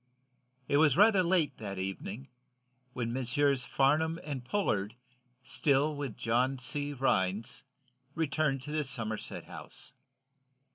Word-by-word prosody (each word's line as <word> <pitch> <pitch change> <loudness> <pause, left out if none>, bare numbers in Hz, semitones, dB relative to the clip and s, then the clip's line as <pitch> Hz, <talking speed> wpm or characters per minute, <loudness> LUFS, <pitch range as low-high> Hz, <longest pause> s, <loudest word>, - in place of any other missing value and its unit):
It 145 - +3
was 150 -1 +5
rather 205 -1 +6
late, 175 -4 +1
that 100 -3 -5
evening 95 +7 -5 0.6
when 120 -2 -2
Messrs. 130 +1 +1
Farnum 155 +4 +2
and 140 -4 -4
Pollard, 115 - -1 0.5
still 145 +2 +2
with 140 -6 -5
John 125 +4 +1
C. 145 +3 -2
Rhinds, 110 -6 0 0.5
returned 150 -4 0
to 150 - -6
the 155 0 0
Somerset 115 -6 -3
House. - - -7
135 Hz, 115 wpm, -31 LUFS, 115-150 Hz, 0.6 s, rather